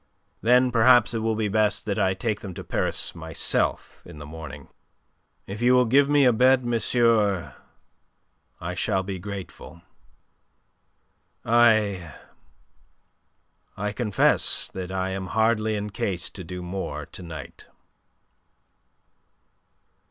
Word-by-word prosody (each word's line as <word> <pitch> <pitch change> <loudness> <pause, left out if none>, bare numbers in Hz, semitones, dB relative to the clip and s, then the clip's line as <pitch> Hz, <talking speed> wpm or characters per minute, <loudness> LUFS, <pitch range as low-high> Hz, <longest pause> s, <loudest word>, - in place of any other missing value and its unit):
Then 125 +2 +4
perhaps 120 +1 +5
it 115 - -1
will 110 0 -1
be 110 -1 -1
best 105 0 +1
that 105 0 -2
I 95 -1 +1
take 105 +1 -2
them 95 -4 -8
to - - -7
Paris - - -2
myself, 80 -1 -2
in - - -13
the 75 - -9
morning. 75 -2 -10 0.8
If 100 +3 -7
you 125 +1 +4
will 125 0 +4
give 140 +4 +3
me 145 -1 +4
a 125 - +5
bed, 130 +2 +3
monsieur, 115 -4 +1 1.1
I 90 +1 -5
shall 95 +1 -1
be 95 -1 -5
grateful. 95 -3 -9 1.6
I... 110 -8 +3 1.6
I 105 +1 -2
confess 105 -2 +1
that 95 -1 -6
I 95 0 -2
am 95 -1 -4
hardly 110 +1 +1
in 105 0 -4
case 95 -3 -3
to 95 - -9
do 90 +1 -7
more 95 +2 -5
to - - -12
night." 80 -5 -10
105 Hz, 125 wpm, -24 LUFS, 95-115 Hz, 1.6 s, perhaps